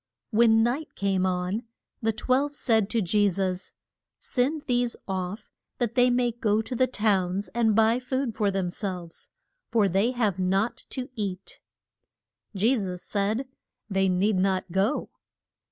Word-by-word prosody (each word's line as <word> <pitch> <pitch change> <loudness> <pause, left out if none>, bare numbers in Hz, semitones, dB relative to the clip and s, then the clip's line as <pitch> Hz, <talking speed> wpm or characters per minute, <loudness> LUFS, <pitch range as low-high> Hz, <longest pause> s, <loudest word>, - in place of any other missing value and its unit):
When 225 0 +5
night 260 +7 -2
came 190 -2 +1
on, 180 +4 -1 0.4
the 225 -1 +2
twelve 260 +6 0
said 220 -7 +2
to 225 -1 +1
Je 205 +3 +3
sus, 185 0 -2 0.4
Send 285 +4 -1
these 245 -1 0
off 190 +2 -4 0.3
that 240 -3 -1
they 250 -1 +4
may 245 0 +2
go 220 -2 +1
to 250 - -5
the 255 +2 +3
towns 200 -5 0
and 220 +1 +2
buy 225 +2 +4
food 260 -1 -2
for 210 -1 +1
them 190 -2 -1
selves, 180 -4 -5 0.4
for 215 -4 +3
they 195 +5 +2
have 215 -7 0
nought 195 +5 0
to 255 -1 -4
eat. 195 -5 -5 1.0
Je 225 +7 +3
sus 185 -5 -3
said, 215 +6 -1 0.4
They 195 0 +2
need 190 +3 +2
not 185 -1 0
go. 195 - 0
210 Hz, 150 wpm, -26 LUFS, 190-240 Hz, 1.0 s, When